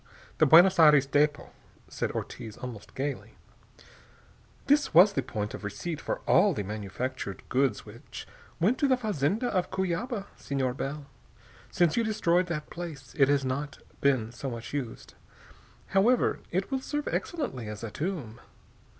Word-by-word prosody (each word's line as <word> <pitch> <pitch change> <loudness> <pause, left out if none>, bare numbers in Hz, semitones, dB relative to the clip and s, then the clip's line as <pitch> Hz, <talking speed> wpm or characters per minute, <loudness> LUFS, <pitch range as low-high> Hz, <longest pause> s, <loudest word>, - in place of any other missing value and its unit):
"The 155 - +5
Buenos 175 +5 +7
Aires 150 -3 +7
depot," 145 +1 +1 0.4
said - - -3
Ortiz 110 -2 -6
almost 120 -4 -9
gaily. 140 +1 -4 1.3
"This 290 - +2
was 190 +4 +8
the 135 - 0
point 110 -5 -4
of - - -8
receipt 145 - -4
for - - -3
all - - +4
the 105 - -2
manufactured 105 +2 -5
goods 130 -4 +1
which - - -10 0.3
went 210 +9 +2
to 285 - +3
the 260 -1 +3
fazenda 210 - 0
of 185 -3 0
Cuyaba, 190 +4 -2
Senor 135 -3 -2
Bell. 140 +2 -5 0.6
Since 175 +1 +2
you 235 - +3
destroyed 180 -5 +1
that 155 -3 -4
place, 155 -7 -8
it 135 -2 +4
has 140 -1 +2
not 140 +3 -3 0.2
been 130 -5 +2
so 125 +3 -5
much 115 +1 -7
used. 130 -6 -5 0.8
However, 220 +6 +3
it 190 +6 -2
will 265 -1 -1
serve 295 +2 -3
excellently 250 - -3
as 105 +1 -7
a 115 - -5
tomb. 145 - -4
145 Hz, 150 wpm, -28 LUFS, 125-190 Hz, 1.3 s, was